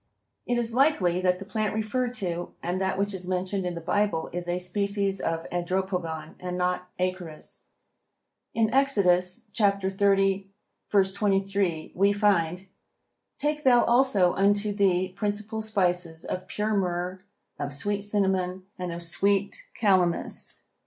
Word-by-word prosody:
It 245 0 +1
is 235 -1 0
likely 215 - +3
that 180 -1 +2
the 195 - -8
plant 215 0 -2
referred 245 +3 -1
to 175 -4 -3
and 180 +2 -1
that 190 0 0
which 200 +1 0
is 185 -1 -5
mentioned 185 +1 -1
in 175 - -3
the 170 - -5
Bible 200 -2 0
is 175 0 -4
a 175 0 0
species 200 +2 -1
of 165 0 -2
Andropogon, 175 -3 -2
and 180 0 -4
not 180 0 -1
Acorus. 180 -4 -4 0.9
In 225 0 +2
Exodus, 195 -8 +3
30:23, 195 -2 0
we 200 +2 +4
find: 190 -3 +1 0.7
"Take 300 +1 -1
thou 245 -2 +6
also 235 -8 +4
unto 205 +1 +2
thee 185 -2 +2
principal 210 +3 -3
spices 180 -6 0
of 185 0 -4
pure 215 +1 -1
myrrh, 180 -1 -1 0.4
of 145 0 -3
sweet 200 +8 -2
cinnamon, 190 -3 0 0.2
and 180 -1 -3
of 170 0 -3
sweet 200 +4 0
Calamus." 185 -5 +2
190 Hz, 130 wpm, -27 LUFS, 180-205 Hz, 0.9 s, thou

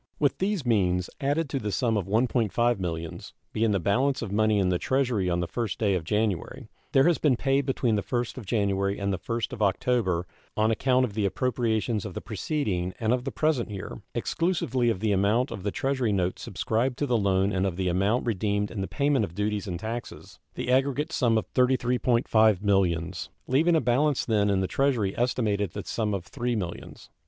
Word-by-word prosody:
With 145 -2 +1
these 190 -6 -1
means, 90 -6 +1
added 145 +3 0
to 135 - -1
the 105 -3 -3
sum 115 +4 +1
of 100 -4 -1
$1.5 120 +1 +1
millions, 85 -3 -5 0.2
being 110 +1 +1
the 100 -2 +1
balance 125 +9 +1
of 105 - -5
money 110 +1 +2
in 95 -2 +2
the 90 -1 +1
Treasury 125 -8 0
on 85 0 0
the 90 - -2
1st 115 +1 -3
day 105 -3 +1
of 90 -3 -1
January, 105 +1 -2 0.2
there 135 - +5
has 175 -2 +3
been 145 -5 +3
paid 135 +2 +1
between 125 -3 +1
the - - 0
1st 120 +2 -2
of 110 - -11
January 100 -2 0
and 100 0 -1
the 95 - -3
1st 115 +5 -3
of 120 - -6
October 100 -4 +1 0.3
on 110 +1 +3
account 130 +3 +2
of 110 - -7
the 105 -1 +1
appropriations 110 0 0
of 90 - -7
the - - -2
preceding 100 - -2
and 115 +1 +1
of 125 0 -1
the 135 - -2
present 150 -7 0
year 95 -11 -7
(exclusively 130 -9 0
of 100 -5 -1
the 110 -1 +1
amount 105 +7 +2
of 100 - -5
the 105 - -1
Treasury 130 0 0
notes 95 -2 -1
subscribed 120 +3 -1
to 145 - 0
the 125 -3 +1
loan 100 -2 +2
and 95 0 +1
of 90 - -3
the 95 -1 -1
amount 100 +7 +1
redeemed 105 -2 0
in 105 - -4
the 95 - -2
payment 140 -4 +1
of 85 -4 -5
duties 105 +1 -1
and 85 -3 -4
taxes) 115 +4 -7 0.2
the 125 - -2
aggregate 140 +4 +1
sum 115 -6 +2
of 110 - -2
$33.5 120 -5 +3
millions, 90 -4 0 0.2
leaving 160 +6 +3
a - - +4
balance 130 +3 +1
then 105 -3 +2
in 95 -1 +2
the 95 - 0
Treasury 120 -8 +1
estimated 110 -5 0
at - - -28
the - - -20
sum 105 -3 -1
of 95 -2 -5
$3 120 +5 -2
millions. 90 -4 -7
110 Hz, 210 wpm, -27 LUFS, 100-125 Hz, 0.3 s, there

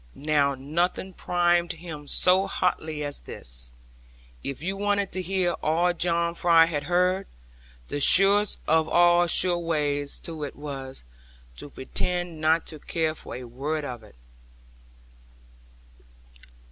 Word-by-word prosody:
Now 145 -2 +1
nothing 170 +7 -2
primed 175 -1 +1
him 155 -3 -9
so 185 +5 +4
hotly 160 -5 -2
as 145 -1 -2
this: - - -3 0.7
if 140 +2 -5
you 190 +2 -2
wanted 200 -1 0
to 185 - -2
hear 185 -1 0
all 170 +3 +2
John 170 0 0
Fry 170 -1 +5
had 150 -3 -3
heard, 180 +3 +1 0.6
the 145 - -3
surest 200 +7 +5
of 160 0 +2
all 175 0 +4
sure 175 +1 +3
ways 145 -4 -1
to 160 -3 -5
it 145 - -6
was, 135 -2 -8 0.5
to - - -6
pretend 175 +4 -3
not 160 +1 +2
to 155 - -7
care 160 +1 -1
for 155 - -9
a 125 - -7
word 140 +6 -4
of 120 -4 -6
it. 105 -2 -18
165 Hz, 135 wpm, -25 LUFS, 145-175 Hz, 0.7 s, Fry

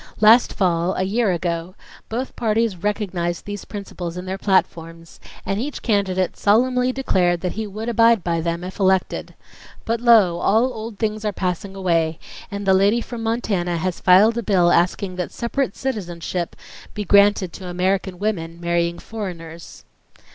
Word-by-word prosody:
Last 220 +3 +6
fall, 175 -2 +1
a 185 - 0
year 210 +2 +1
ago, 170 +1 -3 0.3
both 245 +4 -4
parties 225 -2 0
recognized 180 -3 -2
those 205 -1 -6
principles 180 -4 -7
in 180 - -6
their 190 +1 -4
platforms, 165 -4 -1 0.3
and 195 +2 -1
each 290 +3 -5
candidate 190 -4 0
solemnly 250 +4 +2
declared 180 -10 +1
that 180 - -2
he 220 0 -4
would 215 +3 -6
abide 230 -3 +4
by 170 -1 0
them 170 +1 -2
if 185 +3 -8
elected. 190 -1 0 0.5
But 230 +1 -1
lo, 215 -8 +5
all 235 +5 +2
old 220 -1 -7
things 215 0 -2
are 210 - 0
passing 190 +1 -3
away, 165 -4 0 0.3
and 200 -1 -5
the 190 - +4
lady 200 +5 +3
from 235 0 -7
Montana 205 -7 -1
has 180 +1 -2
filed 210 +6 +5
a - - -1
bill 185 -5 +3
asking 180 +2 +1
that 180 - -3
separate 245 0 -2
citizenship 175 -8 -4 0.4
be 210 -1 -3
granted 200 -2 +4
to 185 - -8
American 185 +1 -1
women 170 -5 -3
marrying 170 0 0
foreigners." 170 -7 -8
190 Hz, 160 wpm, -21 LUFS, 175-220 Hz, 0.5 s, Last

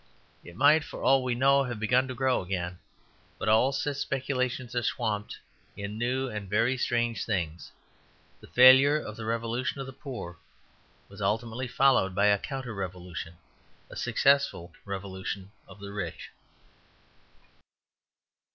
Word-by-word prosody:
It 85 - -12
might, 150 +4 +5
for - - -9
all 135 -1 +4
we 125 -1 -1
know, 140 +2 +4
have 120 -4 -5
begun 125 +4 +2
to 130 - -6
grow 130 0 +1
again; 90 -1 -4 0.6
but - - -4
all 110 +5 +4
such 140 +1 -2
speculations 130 -2 -2
are 120 - 0
swamped 110 -4 -2 0.4
in 100 +2 -5
new 130 +3 0
and 105 -5 -6
very 115 +5 +2
strange 120 -4 0
things. 85 -6 -3 0.7
The - - -15
failure 130 +4 +7
of 110 -7 -7
the 110 - -7
revolution 115 +4 -2
of 135 - -4
the 135 - -9
poor 120 - -8 0.7
was 100 +1 -12
ultimately 115 +5 -1
followed 120 -8 +3
by 100 - +3
a 100 -1 +4
counter 130 -1 -5
revolution; 90 -3 -6 0.6
a - - -9
successful 140 -11 +1
revolution 95 0 -5 0.2
of 95 +1 -14
the 100 0 -8
rich. 105 - -6
115 Hz, 140 wpm, -28 LUFS, 100-130 Hz, 0.7 s, failure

